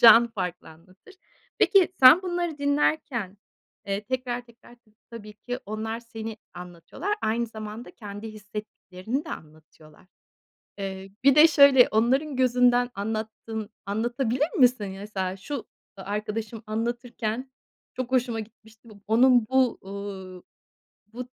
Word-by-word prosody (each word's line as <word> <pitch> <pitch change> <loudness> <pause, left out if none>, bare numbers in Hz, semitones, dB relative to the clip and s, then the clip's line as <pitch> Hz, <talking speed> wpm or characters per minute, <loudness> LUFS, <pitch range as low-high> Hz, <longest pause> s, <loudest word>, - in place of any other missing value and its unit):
Can 235 0 +9
farklı 180 -5 -5
anlatır. 185 - -18 0.4
Peki 390 -4 +5
sen 270 +8 +9
bunları 350 -4 -2
dinlerken, 285 -8 0 0.5
eee, 200 +1 -2
tekrar 250 0 -3
tekrar, 235 +1 -18
tabii 215 - -29 0.2
tabii 215 -2 -9
ki 245 +4 -5
onlar 220 +2 -4
seni 225 -1 -7 0.2
anlatıyorlar, 180 - -5
aynı 230 +2 0
zamanda 220 +1 -8
kendi 205 0 -8
hissettiklerini 210 - -6
de - - -8
anlatıyorlar. 155 +1 -13 0.7
Eee, 195 0 -6
bir 275 -1 +7
de 310 +2 +8
şöyle: 280 -4 +7
Onların 260 +6 +1
gözünden 245 -1 +3
anlattın 220 +1 -4 0.2
anlatabilir 240 +7 0
misin? 250 -6 +4
Mesela, 195 -2 -4
"Şu 225 +4 -6 0.3
a - - -7
arkadaşım 210 +2 -4
anlatırken 235 +2 -3 0.4
çok 255 0 -4
hoşuma 240 -3 +1
gitmişti, 220 +1 -15 0.2
onun 240 +1 +5
bu, 260 -2 +2
uuu, 190 -2 -8 0.7
bu, 245 - -10
225 Hz, 120 wpm, -26 LUFS, 205-255 Hz, 0.7 s, Can